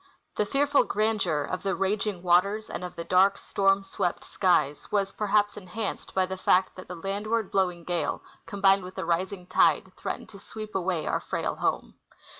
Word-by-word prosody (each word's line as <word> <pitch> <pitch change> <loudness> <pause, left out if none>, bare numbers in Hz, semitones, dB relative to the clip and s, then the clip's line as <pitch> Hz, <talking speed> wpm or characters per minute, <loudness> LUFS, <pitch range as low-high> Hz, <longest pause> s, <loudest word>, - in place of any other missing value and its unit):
The 210 - 0
fearful 285 +3 +3
grandeur 205 -8 0
of 185 - -4
the 195 -1 -1
raging 195 -1 -1
waters 200 +5 +2
and - - -5
of 180 - -6
the 170 - -5
dark 185 +3 +4
storm 195 0 +1
SAvept 175 -2 -2
skies 155 -7 +1
Avas, 195 -2 -1
perhaps, 205 0 +1
enhanced 205 +2 -5
by 190 -1 +3
the 190 0 -5
fact 185 0 +2
that 185 - -10
the 180 - -6
landAvard 205 +4 -2
bloAving 180 -3 0
gale, 175 -1 -2 0.2
combined 195 -1 +3
Avith 185 +1 -10
a - - -3
rising 180 +2 -1
tide, - - +3
threatened - - -5
to 200 - -12
SAveep 215 +2 -8
aAvay 180 -4 -1
our - - +1
frail - - -2
home. - - -2
195 Hz, 180 wpm, -27 LUFS, 180-205 Hz, 0.2 s, dark